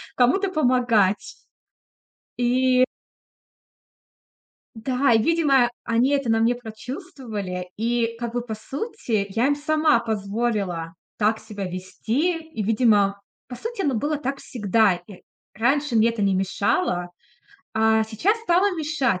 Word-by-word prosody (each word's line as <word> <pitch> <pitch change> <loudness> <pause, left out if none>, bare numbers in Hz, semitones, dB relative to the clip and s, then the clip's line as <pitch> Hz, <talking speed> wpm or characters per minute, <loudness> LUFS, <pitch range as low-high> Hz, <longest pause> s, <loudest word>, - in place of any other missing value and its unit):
кому-то 320 +11 +3
помогать. 245 - +2 1.0
И 255 +1 +3 1.9
Да, 255 +3 +1
и, 225 - +4
видимо, 275 -4 +3
они 235 +4 +2
это 275 -4 0
на 225 - +3
мне 230 +2 +3
прочувствовали, 225 - -6
и 230 +1 0
как 235 -1 -4
бы, 245 - -1
по 230 -2 -5
сути, 235 - -3
я 225 +5 +1
им 285 - +2
сама 305 -3 +2
позволила 200 -6 -2 0.2
так 215 +1 +2
себя 210 -3 -6
вести. 230 - -2
И, 320 -9 -6
видимо, 205 -2 +2 0.3
по 245 - -7
сути, 460 - -4
оно 280 -4 +1
было 290 +6 -1
так 275 0 -4
всегда. 210 -3 +2
И 195 -2 -13 0.3
раньше 265 +4 +1
мне 225 +1 +5
это 230 -3 -2
не 195 -1 +2
мешало, 190 - 0 0.7
а 220 0 +3
сейчас 285 - 0
стало 385 -1 +2
мешать. 285 - 0
235 Hz, 130 wpm, -23 LUFS, 215-280 Hz, 1.9 s, мне